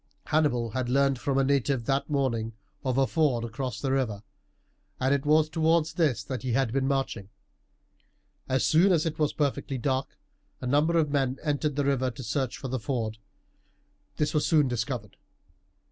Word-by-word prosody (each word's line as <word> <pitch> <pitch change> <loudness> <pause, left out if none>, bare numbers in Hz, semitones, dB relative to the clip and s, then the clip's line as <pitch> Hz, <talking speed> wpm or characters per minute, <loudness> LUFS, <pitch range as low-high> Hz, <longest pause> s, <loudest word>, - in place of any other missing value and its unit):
Hannibal 125 -7 +1
had 125 +1 -2
learned 135 0 +2
from 135 +1 -1
a 135 - +4
native 135 -2 +1
that 135 +4 0
morning 120 -6 0 0.3
of 130 -1 0
a 135 - +4
ford 140 -7 +1
across 125 +2 -4
the 135 - -1
river, 115 -7 -1 0.8
and 130 +2 +2
it 140 +1 -1
was 155 +1 +5
towards 160 0 +1
this 150 -10 +1
that 130 +3 -5
he 125 -2 -2
had 130 -2 +1
been 135 0 +1
marching. 135 -7 -2 1.2
As 130 0 +2
soon 175 +5 +5
as 160 -2 +2
it 160 -1 -3
was 150 -1 +2
perfectly 140 -2 -1
dark 130 +2 -2 0.4
a - - -6
number 150 +6 +2
of 150 -3 +2
men 135 -2 0
entered 150 -1 0
the 145 -1 0
river 130 -2 +1
to 125 +2 -8
search 130 +2 -2
for 135 - -6
the 130 0 -2
ford. 110 -1 -3 1.0
This 150 - 0
was 150 - +2
soon 150 -4 +3
discovered. 120 -3 -3
135 Hz, 175 wpm, -27 LUFS, 125-150 Hz, 1.2 s, was